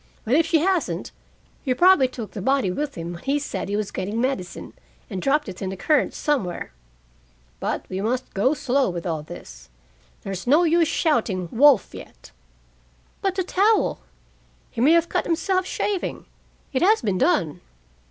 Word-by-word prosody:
But 225 - 0
if 325 +3 +4
she 325 -2 +3
hasn't 370 0 0 0.5
He 255 -3 0
probably 350 -4 +5
took 240 -4 -8
the 200 - -6
body 265 -4 +1
with 290 +9 -3
him 170 +1 -5
when 170 - -9
he 275 +2 0
said 290 -8 -4
he 205 - -1
was 210 -1 -2
getting 200 +4 -3
medicine, 240 -8 -3 0.4
and 185 - -3
dropped 295 +4 +1
it 185 -2 -8
in 190 - -2
the 190 - -6
current 300 - +1
somewhere. 245 - -2 0.9
But - - -3
we 190 +1 -4
must 250 +4 -2
go 255 +10 +2
slow 275 -2 +1
with 175 -2 -5
all 160 -3 -2
this. - - -11 0.5
There's 195 +2 -5
no 300 +7 +5
use 335 0 +3
shouting 220 - 0
'wolf' 265 -2 +4
yet." - - -12 0.9
"But 385 -1 0
the 375 - 0
towel?" 405 +4 +2 0.7
"He - - -4
may 295 +6 +6
have 335 0 +3
cut - - -1
himself, 370 +3 0
shaving. 405 -3 -3 0.5
It 260 - 0
has 425 +5 +4
been 195 -4 0
done." 185 - +1
260 Hz, 170 wpm, -23 LUFS, -, 0.9 s, may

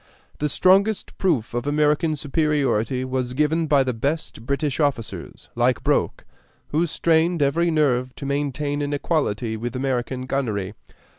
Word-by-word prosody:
The 150 - 0
strongest 195 +7 +3
proof 145 - 0
of 120 +3 -2
American 150 +2 +2
superiority 135 -5 0
was 130 -1 -2
given 155 +3 +1
by 145 -2 +4
the 130 -1 -1
best 135 -1 -3
British 140 0 -1
officers, 140 -7 -3
like 120 +1 +1
Broke, - - 0 0.4
who 165 +3 +1
strained 165 0 +2
every 170 +5 +2
nerve 130 -5 +1
to 140 - -7
maintain 145 +1 -1
an 145 0 -2
equality 125 -7 -1
with 120 +3 -5
American 130 -1 -2
gunnery. 110 -8 -2
140 Hz, 140 wpm, -23 LUFS, 125-155 Hz, 0.4 s, by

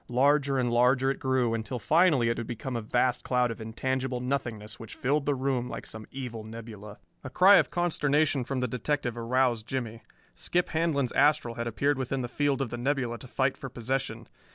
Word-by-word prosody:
Larger 140 +2 +3
and 125 -2 +1
larger 125 +2 +3
it - - -5
grew, 130 -3 +1
until 115 +2 -3
finally 140 - +3
it 115 - -1
had 115 - -5
become 120 +2 -5
a 115 - -1
vast 120 +3 +1
cloud 125 -2 +1
of 115 - -7
intangible 130 +3 -2
nothingness 120 -5 -3
which 115 - -9
filled 140 +2 0
the 145 - +2
room 130 -2 -1
like - - -6
some 110 0 -9
evil 125 -4 -6
nebula. 110 -2 -9 0.3
A 130 - -6
cry 190 +9 +7
of - - +3
consternation 150 -5 +1
from 130 +1 -3
the 125 - 0
detective 125 +1 -2
aroused 120 -1 0
Jimmie. 115 -4 -4 0.3
Skip 180 0 -1
Handlon's 155 -6 0
astral 145 -4 +3
had 115 0 -4
appeared 140 +5 0
within 130 0 -2
the - - -2
field 140 +2 0
of 125 - -5
the 120 - -4
nebula 125 -3 -1
to 130 - -11
fight 130 +2 0
for 135 - -7
possession. 130 +3 -3
125 Hz, 200 wpm, -28 LUFS, 115-140 Hz, 0.3 s, cry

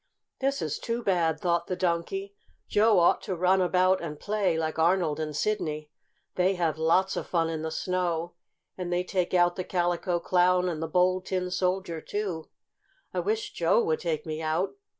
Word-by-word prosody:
"This 275 +1 0
is - - -3
too 235 0 -3
bad!" 170 -5 +1
thought 170 -1 0
the 185 - -2
Donkey. 185 - -2 0.3
"Joe 215 0 +4
ought 170 -1 +4
to 190 - -3
run 185 +2 +3
about 185 +1 +3
and 150 -3 -6
play 205 -5 0
like 160 0 -2
Arnold 165 -2 +2
and 155 -1 -3
Sidney. 155 -6 -2 0.4
They 185 +1 +2
have 165 -3 -1
lots 180 +4 +2
of - - -4
fun 165 -2 +1
in 160 -1 -3
the 160 - -3
snow, 175 0 -2 0.4
and 180 -1 -5
they 175 +1 +1
take 185 -1 -1
out 175 0 +3
the 185 - -2
Calico 175 -1 0
Clown 180 +1 +3
and 165 -3 -3
the 165 - -2
Bold 185 +2 +2
Tin 180 -1 -2
Soldier, 180 -3 -1
too. 190 -6 -4 0.6
I - - -1
wish 435 +1 -2
Joe 480 - +3
would 465 +1 0
take 160 -2 -2
me 155 0 -4
out. 160 +4 0
180 Hz, 185 wpm, -27 LUFS, 165-190 Hz, 0.6 s, Joe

